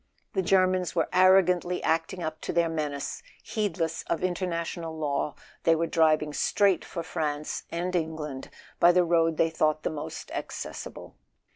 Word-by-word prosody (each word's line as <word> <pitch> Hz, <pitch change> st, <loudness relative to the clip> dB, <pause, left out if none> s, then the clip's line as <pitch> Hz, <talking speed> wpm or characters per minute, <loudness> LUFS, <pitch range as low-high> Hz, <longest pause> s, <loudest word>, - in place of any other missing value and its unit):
The 190 Hz, -, +1 dB
Germans 185 Hz, -1 st, +2 dB
were 165 Hz, -, +2 dB
arrogantly 180 Hz, -1 st, +4 dB
acting 165 Hz, +3 st, 0 dB
up 155 Hz, 0 st, -4 dB
to -, -, -3 dB
their 170 Hz, -1 st, +2 dB
menace: 150 Hz, -3 st, -3 dB, 0.2 s
heedless 180 Hz, -6 st, -2 dB
of 170 Hz, -, -1 dB
international 170 Hz, -2 st, -2 dB
law, 145 Hz, -1 st, -1 dB, 0.3 s
they 165 Hz, -, +4 dB
were 165 Hz, +1 st, 0 dB
driving 155 Hz, -2 st, +2 dB
straight 195 Hz, +3 st, +2 dB
for 170 Hz, -, -5 dB
France 150 Hz, -3 st, -3 dB
and 175 Hz, +2 st, -2 dB
Eng¬ 160 Hz, -2 st, -1 dB
land 150 Hz, -4 st, -6 dB, 0.3 s
by 175 Hz, -, +7 dB
the 180 Hz, 0 st, +5 dB
road 165 Hz, -1 st, +2 dB
they 165 Hz, -, +3 dB
thought 155 Hz, -1 st, +1 dB
the -, -, -1 dB
most 150 Hz, -1 st, -6 dB
accessible. -, -, -6 dB
165 Hz, 155 wpm, -27 LUFS, 155-180 Hz, 0.3 s, by